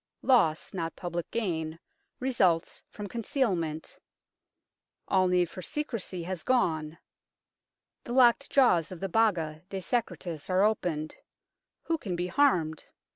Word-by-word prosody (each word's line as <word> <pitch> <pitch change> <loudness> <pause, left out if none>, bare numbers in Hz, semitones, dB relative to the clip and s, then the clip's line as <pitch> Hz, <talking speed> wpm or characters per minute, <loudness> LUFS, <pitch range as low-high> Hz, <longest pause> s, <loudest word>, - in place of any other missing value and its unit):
Loss, 165 - +3
not 165 -3 -3
public 175 -1 -4
gain, 165 -8 -2 0.4
results 190 -11 +1
from 210 - -7
concealment. 200 - -2 1.1
All 185 -1 +3
need 180 -1 +3
for 185 - -9
secrecy 220 - -3
has 180 -1 -4
gone; 165 -11 0 1.1
the 240 - -5
locked 255 +2 +5
jaws 215 - +4
of 180 - -7
the 195 - -3
Baga 170 -7 +1
de 195 - -4
Secretis 185 - -3
are 185 +1 +3
opened 170 -8 0 0.7
who 330 -1 -1
can 185 - -3
be 175 +1 -1
harmed 180 - +2
185 Hz, 125 wpm, -29 LUFS, 165-235 Hz, 1.1 s, locked